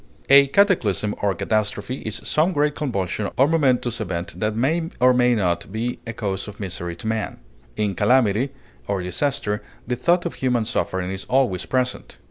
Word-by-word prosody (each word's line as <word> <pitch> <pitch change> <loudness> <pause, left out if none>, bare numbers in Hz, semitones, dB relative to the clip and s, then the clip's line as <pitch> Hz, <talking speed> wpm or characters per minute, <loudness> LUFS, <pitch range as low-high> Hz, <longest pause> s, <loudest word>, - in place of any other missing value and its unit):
A 140 0 +8
cataclysm 135 - +2
or 100 -2 +1
catastrophe 110 +5 -1
is 110 0 -5
some 165 +5 +2
great 150 -1 +2
convulsion 100 - -2
or 135 - +5
momentous 130 -7 +1
event 90 -1 -4
that 110 0 0
may 160 +8 0
or 125 0 +6
may 125 0 +3
not 90 -3 -1
be 115 +3 -3
a 115 - -4
cause 100 -4 -3
of 105 -1 -10
misery 90 -3 -4
to 85 - -11
man. 110 -1 -2 0.4
In 105 -2 0
calamity, 115 +3 +3 0.4
or 100 -2 -1
disaster, 105 +1 -1 0.2
the 125 - -1
thought 175 +8 +2
of 170 - -2
human 125 -4 0
suffering 95 -5 -1
is 95 0 -5
always 125 -9 +1
present. 125 -1 -2
110 Hz, 170 wpm, -22 LUFS, 100-130 Hz, 0.4 s, A